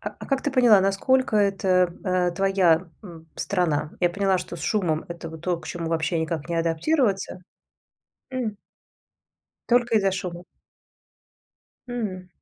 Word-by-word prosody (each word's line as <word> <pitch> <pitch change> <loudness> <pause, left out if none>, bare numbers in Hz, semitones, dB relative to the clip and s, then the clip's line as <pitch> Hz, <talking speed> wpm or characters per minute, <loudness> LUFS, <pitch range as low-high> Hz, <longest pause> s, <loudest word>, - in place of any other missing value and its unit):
А - - -4
а - - -7
как 270 -1 0
ты 290 - 0
поняла, 245 -6 +6
насколько 215 +6 +2
это, 190 -3 +2
э, 180 -1 +1
твоя, 185 -2 +2
м, 165 -5 -12
страна? 160 -6 0
Я 175 -1 +3
поняла, 195 0 +1
что 175 - -6
с - - -10
шумом 170 -6 0
это 170 -1 -7
вот 160 -1 -10
то, 180 -1 0
к 155 - -12
чему 170 0 -4
вообще 165 +1 0
никак 160 -1 -3
не 170 - -1
адаптироваться? 195 - 0 0.9
М. 240 -5 -3 1.1
Только 240 -1 +3
из-за 195 -2 +2
шума. 180 -2 -5 1.4
Мгм. 205 -7 -4
185 Hz, 145 wpm, -24 LUFS, 170-210 Hz, 1.4 s, поняла